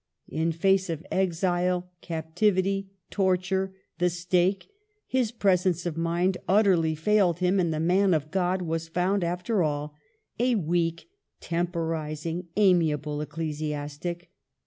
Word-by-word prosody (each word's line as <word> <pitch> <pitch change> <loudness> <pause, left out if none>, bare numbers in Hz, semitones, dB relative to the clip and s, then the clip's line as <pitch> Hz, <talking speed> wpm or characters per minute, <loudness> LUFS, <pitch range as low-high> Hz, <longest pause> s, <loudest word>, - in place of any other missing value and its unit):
In 160 +1 0
face 190 +3 +2
of 165 -1 -4
exile, 180 0 0
cap 160 -2 -6
tivity, 195 0 +2 0.2
torture, 190 0 0 0.2
the 180 0 +3
stake, 175 +2 0 0.4
his 255 -4 0
presence 185 -6 +1
of 170 -3 -2
mind 170 +3 0
utterly 185 -6 +3
failed 180 +1 +2
him, 185 +2 +2
and 170 -3 +1
the 155 - -2
Man 180 +2 +3
of 155 0 -3
God 185 0 0
was 165 -1 -2
found, 180 +3 0
after 180 +5 0
all, 150 -1 -1 0.5
a 245 0 +3
weak, 170 - -1 0.3
temporizing, 165 -1 -3
amiable 155 -7 +2
ecclesiastic. 150 +2 -4
175 Hz, 125 wpm, -27 LUFS, 160-190 Hz, 0.5 s, the